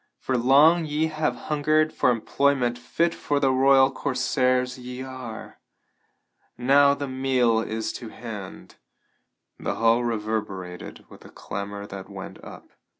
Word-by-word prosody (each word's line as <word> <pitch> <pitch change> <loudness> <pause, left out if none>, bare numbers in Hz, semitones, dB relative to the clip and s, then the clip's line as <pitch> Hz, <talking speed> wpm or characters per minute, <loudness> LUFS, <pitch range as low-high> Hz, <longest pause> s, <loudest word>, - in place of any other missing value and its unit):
For 130 - -2
long 145 +7 +5
ye 150 +2 0
have 155 -1 -1 0.2
hungered 155 +1 +2
for - - +2
employment 125 +1 +1
fit 165 +8 -1
for 145 -1 -1
the 135 -2 +2
royal 135 0 +5
corsairs 130 -1 0
ye 125 +1 -7
are. 130 -4 -9 1.0
Now 140 +3 +4
the 140 0 -5
meal 130 -3 +1
is 110 0 -3
to 115 - -7
hand." 105 -6 -9 0.8
The - - -3
hall 115 +1 +3
reverberated 105 -6 -4
with - - -15
the - - -14
clamor 100 +1 -6
that 95 -2 -9
went - - -9
up. - - -12
130 Hz, 135 wpm, -25 LUFS, 115-140 Hz, 1.0 s, long